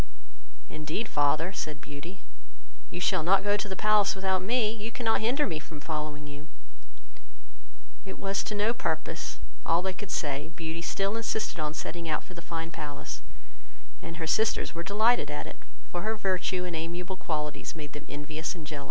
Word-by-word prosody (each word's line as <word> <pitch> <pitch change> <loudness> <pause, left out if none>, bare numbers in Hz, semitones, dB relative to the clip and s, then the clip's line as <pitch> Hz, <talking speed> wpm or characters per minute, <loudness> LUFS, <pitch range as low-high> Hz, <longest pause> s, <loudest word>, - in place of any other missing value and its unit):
"Indeed, 155 +8 -2
father 155 +5 +3
(said 155 -5 -3
Beauty), 145 +7 -7 0.7
you - - -4
shall 180 - +4
not 190 +4 +5
go 205 0 +4
to 205 0 -1
the 190 - -2
palace 210 0 +5
without 190 -1 +2
me, 220 +2 +3
you 220 0 -3
cannot 225 -2 +2
hinder 260 +7 +4
me 160 -6 -1
from 155 0 -8
following 150 -1 -3
you." 145 +1 -8 1.5
It 190 - -6
was 195 0 +1
to 210 - -1
no 210 +3 +3
purpose 160 -5 -1 0.3
all 170 +2 +4
they 190 0 +1
could 195 +1 -6
say, 145 -2 0
Beauty 165 0 -3
still 195 +4 +1
insisted 220 -5 0
on 155 0 0
setting 170 0 -3
out 150 - +1
for 185 - -11
the 170 - -7
fine 165 0 -3
palace; 145 -3 -5 0.8
and 165 - -6
her 165 - -1
sisters 220 +7 +3
were 170 - -2
delighted 205 -2 +4
at 150 - -2
it, - - -8 0.3
for 175 - -1
her 220 +3 +1
virtue 185 -2 +1
and 175 -2 -2
amiable 175 +3 -2
qualities 150 -5 -2
made 150 -2 -6
them 145 - -7
envious 155 +3 -3
and 165 -3 -7
jealous. 150 -1 -4
170 Hz, 180 wpm, -30 LUFS, 155-200 Hz, 1.5 s, not